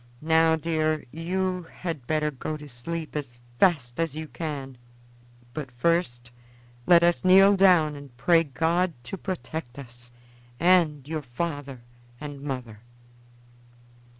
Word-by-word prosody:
Now, 160 Hz, 0 st, +4 dB
dear, 155 Hz, -1 st, -1 dB
you 180 Hz, +3 st, -2 dB
had 160 Hz, -9 st, -6 dB
better 155 Hz, -1 st, +1 dB
go 150 Hz, +3 st, -5 dB
to 150 Hz, -1 st, -11 dB
sleep 155 Hz, +6 st, -6 dB
as 135 Hz, -5 st, -5 dB, 0.2 s
fast 140 Hz, -10 st, +2 dB
as 165 Hz, -3 st, -1 dB
you 155 Hz, 0 st, -5 dB
can; 140 Hz, -6 st, -6 dB, 0.7 s
but 145 Hz, -2 st, -5 dB
first 120 Hz, -3 st, -1 dB, 0.6 s
let 170 Hz, -1 st, +7 dB
us 170 Hz, 0 st, +2 dB
kneel 195 Hz, +2 st, +7 dB
down 180 Hz, -6 st, +5 dB
and 140 Hz, -4 st, -12 dB
pray 165 Hz, +6 st, +4 dB
God 165 Hz, +5 st, 0 dB
to 125 Hz, -, -5 dB
protect 160 Hz, -9 st, -5 dB
us 120 Hz, -2 st, -9 dB, 0.5 s
and 165 Hz, -5 st, +3 dB
your 155 Hz, 0 st, -3 dB
father 140 Hz, -1 st, -5 dB, 0.4 s
and 145 Hz, -2 st, -7 dB
mother." 125 Hz, -6 st, -5 dB
155 Hz, 125 wpm, -26 LUFS, 135-170 Hz, 0.7 s, let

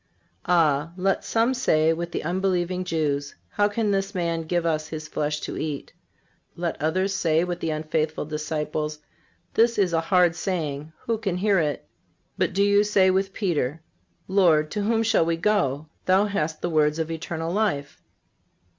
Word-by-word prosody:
Ah! 165 Hz, -2 st, +2 dB
let 195 Hz, +1 st, +1 dB
some 230 Hz, +3 st, +1 dB
say 160 Hz, -11 st, +3 dB
with 170 Hz, +1 st, -4 dB
the -, -, -3 dB
unbelieving 180 Hz, +1 st, 0 dB
Jews: 145 Hz, -5 st, -1 dB
"How 205 Hz, 0 st, +2 dB
can 210 Hz, 0 st, 0 dB
this 195 Hz, 0 st, -1 dB
man 170 Hz, -2 st, -1 dB
give 175 Hz, +1 st, 0 dB
us 155 Hz, -2 st, 0 dB
His 155 Hz, -1 st, -6 dB
flesh 150 Hz, 0 st, -2 dB
to -, -, -5 dB
eat?" 150 Hz, -3 st, -4 dB, 0.6 s
Let 170 Hz, -3 st, -3 dB
others 185 Hz, +5 st, +1 dB
say 165 Hz, -3 st, +2 dB
with 175 Hz, -1 st, -3 dB
the 165 Hz, -, -2 dB
unfaithful 155 Hz, 0 st, -1 dB
disciples: 150 Hz, 0 st, -3 dB, 0.6 s
"This 230 Hz, +1 st, +3 dB
is 190 Hz, -4 st, +2 dB
a 165 Hz, -, +2 dB
hard 175 Hz, 0 st, +3 dB
saying. 155 Hz, -5 st, -3 dB
Who 230 Hz, -2 st, -2 dB
can 195 Hz, -5 st, -2 dB
hear 200 Hz, 0 st, +3 dB
it?" 150 Hz, -3 st, -2 dB, 0.5 s
But -, -, 0 dB
do 200 Hz, +2 st, +3 dB
you 205 Hz, 0 st, +4 dB
say 195 Hz, -3 st, +4 dB
with 195 Hz, +1 st, 0 dB
Peter: 165 Hz, -, -1 dB, 0.4 s
"Lord, 170 Hz, -6 st, +3 dB
to 210 Hz, -, -2 dB
whom 225 Hz, +2 st, +1 dB
shall 220 Hz, -5 st, +3 dB
we 165 Hz, 0 st, 0 dB
go? 165 Hz, -7 st, +1 dB, 0.2 s
Thou 190 Hz, +2 st, +4 dB
hast 180 Hz, -7 st, -2 dB
the 175 Hz, -, 0 dB
words 150 Hz, -1 st, +2 dB
of 160 Hz, 0 st, -2 dB
eternal 165 Hz, +1 st, -4 dB
life." 145 Hz, -10 st, -1 dB
170 Hz, 170 wpm, -25 LUFS, 155-195 Hz, 0.6 s, you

